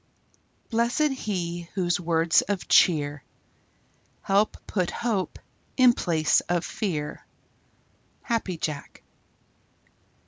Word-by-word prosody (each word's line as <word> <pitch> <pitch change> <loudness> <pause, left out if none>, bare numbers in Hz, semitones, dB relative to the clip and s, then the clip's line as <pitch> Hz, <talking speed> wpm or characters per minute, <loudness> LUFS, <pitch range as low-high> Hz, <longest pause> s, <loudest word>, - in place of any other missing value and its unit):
Blessed 240 +6 +2
he 175 -8 -4
whose 175 -3 +1
words 165 -1 +3
of 200 -3 -3
cheer 145 -4 +3 1.0
Help 200 +2 +2
put 180 -4 -1
hope 220 -6 -2 0.4
in 255 -2 +7
place 160 -7 +2
of 175 -1 0
fear. 155 -8 -4 1.0
_Happy 220 -8 -1
Jack. 150 -3 -5
180 Hz, 90 wpm, -26 LUFS, 165-215 Hz, 1.0 s, in